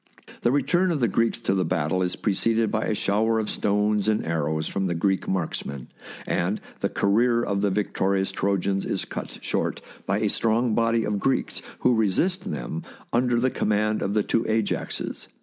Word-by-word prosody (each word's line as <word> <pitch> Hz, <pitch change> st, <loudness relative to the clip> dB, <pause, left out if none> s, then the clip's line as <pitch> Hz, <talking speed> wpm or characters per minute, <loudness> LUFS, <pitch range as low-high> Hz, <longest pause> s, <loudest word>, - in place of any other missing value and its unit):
The 120 Hz, -, +3 dB
return 175 Hz, +6 st, +2 dB
of 165 Hz, -4 st, 0 dB
the 120 Hz, -, +3 dB
Greeks 115 Hz, +4 st, +1 dB
to 105 Hz, -, +1 dB
the 95 Hz, -1 st, +1 dB
battle 85 Hz, +1 st, 0 dB
is 90 Hz, -1 st, 0 dB
pre 105 Hz, -, 0 dB
ceded 115 Hz, +2 st, +1 dB
by 110 Hz, -, 0 dB
a 110 Hz, -, 0 dB
shower 110 Hz, +3 st, +1 dB
of 110 Hz, -1 st, -1 dB
stones 105 Hz, 0 st, +1 dB
and 110 Hz, -, +1 dB
arrows 80 Hz, -1 st, -1 dB
from 95 Hz, -1 st, -1 dB
the 85 Hz, -, -1 dB
Greek 95 Hz, +3 st, 0 dB
marksmen, 75 Hz, -7 st, -3 dB, 0.4 s
and 95 Hz, +5 st, 0 dB, 0.2 s
the -, -, 0 dB
career 115 Hz, +4 st, +2 dB
of 100 Hz, -3 st, -1 dB
the 100 Hz, -, +2 dB
victorious 95 Hz, -1 st, 0 dB
Trojans 95 Hz, 0 st, 0 dB
is -, -, -2 dB
cut -, -, -6 dB
short -, -, -1 dB, 0.3 s
by -, -, +2 dB
a -, -, +2 dB
strong 115 Hz, +1 st, +1 dB
body 115 Hz, 0 st, +2 dB
of 105 Hz, -1 st, -1 dB
Greeks 135 Hz, +5 st, 0 dB, 0.2 s
who -, -, +4 dB
resist 115 Hz, -, +1 dB
them 80 Hz, +2 st, -4 dB, 0.3 s
under 120 Hz, 0 st, +2 dB
the 130 Hz, +2 st, +2 dB
command 105 Hz, +1 st, +1 dB
of 100 Hz, -, -1 dB
the 105 Hz, -, +3 dB
two 115 Hz, -, +1 dB
A 110 Hz, 0 st, +3 dB
j -, -, 0 dB
axes. -, -, -5 dB
105 Hz, 195 wpm, -25 LUFS, 95-115 Hz, 0.4 s, who